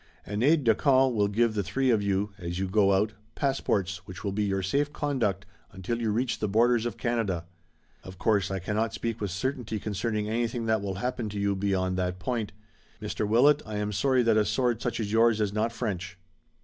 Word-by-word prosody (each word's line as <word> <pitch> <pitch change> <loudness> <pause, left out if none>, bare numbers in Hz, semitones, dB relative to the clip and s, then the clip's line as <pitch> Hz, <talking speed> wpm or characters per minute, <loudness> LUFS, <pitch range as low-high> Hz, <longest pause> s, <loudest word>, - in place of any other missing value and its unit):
An 105 +1 -3
aide 150 +3 +4
de 115 -2 +5
camp 130 +2 +3
will 105 -2 +2
give 110 +2 +1
the 105 - 0
three 125 +8 +1
of 110 -3 +3
you, 100 0 -1
as 85 0 -4
you 95 0 -1
go 100 +1 +3
out, 105 +3 +2 0.2
passports 100 -9 0
which 90 -1 -9
will 100 - -1
be 105 +2 -1
your 95 -1 -1
safe 145 +10 0
conduct 120 -11 -1 0.3
until 95 +5 -4
you 115 - 0
reach 120 +4 0
the 105 - 0
borders 120 +3 +3
of 120 - -6
Canada. 110 -8 -1 0.6
Of 95 0 -10
course, 100 -2 +1
I 95 - -2
cannot 105 +5 -1
speak 115 -1 -3
with 105 - -1
certainty 110 - -3
concerning 105 +1 -2
anything 115 +1 -1
that 110 -2 +1
will 100 -1 -3
happen 120 +1 -3
to 105 0 -5
you 100 0 +1
beyond 95 -1 0
that 90 0 -1
point. 110 +3 -2 0.5
Mr. 105 - -3
Willet, 140 +7 +5
I 110 - -7
am 105 0 -1
sorry 130 +5 +2
that 115 -2 +3
a 110 - +4
sword 120 -2 0
such - - -2
as 105 -2 -2
yours 115 0 +4
is 105 -2 0
not 110 +2 0
French." 95 -5 -4
105 Hz, 215 wpm, -28 LUFS, 100-120 Hz, 0.6 s, de